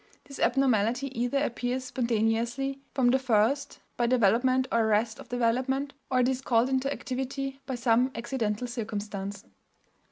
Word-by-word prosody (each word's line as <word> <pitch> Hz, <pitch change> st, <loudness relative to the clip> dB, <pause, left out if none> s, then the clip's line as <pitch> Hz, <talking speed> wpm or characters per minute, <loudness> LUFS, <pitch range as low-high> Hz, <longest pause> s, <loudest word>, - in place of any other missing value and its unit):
This 275 Hz, -, -11 dB
abnormality 250 Hz, 0 st, +1 dB
either 245 Hz, +4 st, 0 dB
appears 255 Hz, -2 st, -1 dB
spontaneously 235 Hz, +2 st, -1 dB
from 255 Hz, -3 st, +2 dB
the 265 Hz, -, +3 dB
first, 255 Hz, +3 st, +1 dB, 0.2 s
by 240 Hz, -, +2 dB
development 255 Hz, +3 st, +3 dB
or 230 Hz, -, +3 dB
arrest 220 Hz, +1 st, +1 dB
of -, -, -11 dB
development, 255 Hz, +4 st, 0 dB, 0.2 s
or 255 Hz, -1 st, +3 dB
it 245 Hz, -, +3 dB
is 260 Hz, 0 st, -1 dB
called 240 Hz, -1 st, +2 dB
into 265 Hz, +1 st, 0 dB
activity 270 Hz, +1 st, -4 dB
by 265 Hz, -, -2 dB
some 240 Hz, +1 st, +3 dB
accidental 230 Hz, -2 st, -2 dB
circumstance. 205 Hz, -4 st, -5 dB
245 Hz, 140 wpm, -28 LUFS, 230-265 Hz, 0.2 s, the